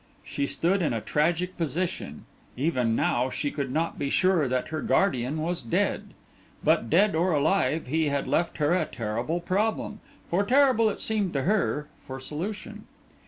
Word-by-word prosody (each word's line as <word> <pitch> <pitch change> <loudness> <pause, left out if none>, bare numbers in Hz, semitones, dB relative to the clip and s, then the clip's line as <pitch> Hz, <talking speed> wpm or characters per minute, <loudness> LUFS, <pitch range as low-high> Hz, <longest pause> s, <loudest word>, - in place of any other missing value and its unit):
She 140 - -2
stood 185 +7 +1
in 155 - +1
a 115 - -1
tragic 170 - 0
position; 165 - -3 0.3
even 125 -5 +1
now, 125 +3 +1
she 145 +2 -2
could 140 -3 -3
not 160 +4 -1
be 140 - -1
sure 185 -3 +3
that 125 0 -1
her 155 -1 -3
guardian 135 -5 +1
was 170 +3 -2
dead. 115 - -1 0.5
But 115 - +2
dead 200 +5 +4
or 170 +2 +2
alive, 160 +2 +1
he 155 +3 0
had 140 -1 -1
left 165 +5 0
her 150 +2 +2
a 185 - +2
terrible 120 +9 -3
problem, 210 +4 -1 0.3
for 185 +4 +1
terrible 255 -2 +4
it - - -5
seemed 210 -5 0
to 135 -2 0
her, 190 -6 +1 0.2
for 130 0 -7
solution. 170 +10 -6
160 Hz, 165 wpm, -27 LUFS, 140-185 Hz, 0.5 s, dead